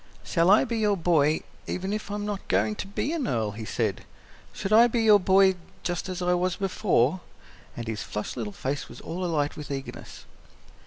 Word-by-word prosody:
"Shall 170 +1 +2
I 205 - +7
be 230 -1 -2
your 210 -2 +2
boy, 155 -3 +2 0.3
even 190 +2 -3
if 215 -1 -4
I'm 205 0 -3
not 205 -2 -4
going 215 - +2
to - - -5
be 255 +9 -2
an 300 -8 -1
earl?" 110 -3 0
he 110 +2 -7
said. - - -2 0.5
"Shall 195 - -3
I 235 +2 +8
be 235 -1 0
your 210 -2 +7
boy, 190 0 +5 0.3
just 175 +1 -2
as 180 -1 -4
I 180 0 +2
was 180 0 +1
before?" 185 - +1 0.6
And 120 -1 -5
his 110 -2 -3
flushed 105 - -5
little 110 -4 -4
face 135 +8 -4
was - - -11
all 180 +3 -5
alight 150 -4 0
with 150 -2 -8
eagerness. 135 -1 -7
180 Hz, 200 wpm, -26 LUFS, 145-205 Hz, 0.6 s, I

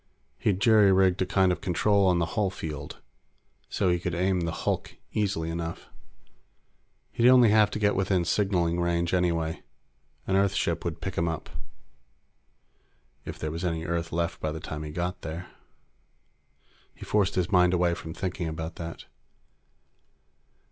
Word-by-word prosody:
He'd 95 -3 +1
jury 110 -3 +5
rigged 95 -1 +3
a 95 - +1
kind 95 -1 +3
of 90 - -3
control 100 +2 +2
on 90 -1 +3
the 85 - +1
hull 105 -4 +1
field, 75 -6 -7 0.7
so - - 0
he 90 0 +2
could 85 0 -3
aim 90 +1 +1
the 85 -1 -1
hulk - - -3 0.2
easily 95 -6 -1
enough. 85 0 -5 1.2
He'd 120 +1 +4
only 125 -3 +7
have 105 -1 +5
to - - -4
get 105 -1 +2
within 95 -2 +1
signaling 90 -5 +1
range, 85 0 0
anyway. 85 -3 0 0.6
An 95 - 0
Earth 100 0 +2
ship 85 0 -1
would 85 -1 -4
pick 95 +3 -3
him 85 - +1
up. 80 -2 -4 1.7
If - - -6
there 75 - -4
was 85 +3 -5
any 85 -2 -2
Earth 85 0 -2
left 85 +1 -2
by 80 - -2
the 80 - -5
time 75 0 -6
he 75 - -6
got 90 +3 -3
there. 85 +3 -7 1.4
He - - -10
forced 100 -2 +1
his 90 +1 0
mind 90 -2 +5
away 90 -1 +2
from 80 -1 -7
thinking 90 -3 -3
about 80 +1 -5
that. 85 -1 -7
90 Hz, 160 wpm, -27 LUFS, 85-95 Hz, 1.7 s, only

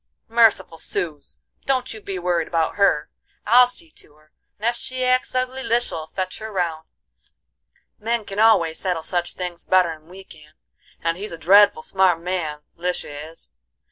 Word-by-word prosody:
"Merciful, 220 -8 +3
suz! 155 - -4 0.3
don't 260 -3 0
you 220 - -10
be 195 -2 -5
worried 175 -2 0
about 165 -2 0
her. 200 -7 +2 0.3
I'll 245 +3 +7
see 325 +6 -7
to 150 - -18
her, 155 0 -26 0.3
and 215 - -7
ef 235 +1 +2
she 255 +1 -3
acts 255 0 +1
ugly 255 +1 -1
Lisha'll 235 -11 -1
fetch 185 +3 -5
her 220 0 -7
round; 170 -5 -2 1.1
men 230 0 -1
can 195 +1 -5
always 190 -8 +4
settle 180 -4 -2
such 175 0 +1
things 180 -2 -5
better'n 165 -4 +1
we 190 +2 -12
can, 150 -4 -17 0.5
and 165 0 0
he's 205 +1 -6
a 165 - -6
dreadful 195 0 +5
smart 190 -3 +2
man 165 -4 -3
Lisha 160 -4 -4
is. 165 - -13
185 Hz, 165 wpm, -22 LUFS, 165-220 Hz, 1.1 s, I'll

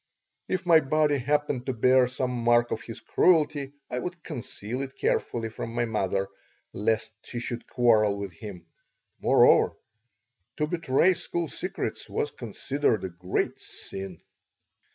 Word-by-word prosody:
If 185 -1 -2
my 165 -2 +7
body 150 0 +2
happened 145 -1 0
to 130 - 0
bear 125 +2 +4
some 125 0 -2
mark 120 -1 +3
of 110 - -2
his 115 0 -8
cruelty 150 -5 +2
I 125 - -3
would 175 +4 -6
conceal 125 -3 -5
it 135 0 -6
carefully 115 -1 0
from 115 +1 -6
my 120 0 +1
mother, 100 -3 0 0.5
lest 110 +1 0
she - - -7
should 120 0 -5
quarrel 110 -4 +3
with 100 -2 -5
him. 90 0 -9 0.5
Moreover, - - +5 0.8
to 150 - +1
betray 165 +2 +3
school 170 -1 -2
secrets - - -4
was - - -1
considered 135 -7 -1
a 95 - -2
great 90 +2 -2
"sin." 95 -3 -7
125 Hz, 140 wpm, -27 LUFS, 110-145 Hz, 0.8 s, my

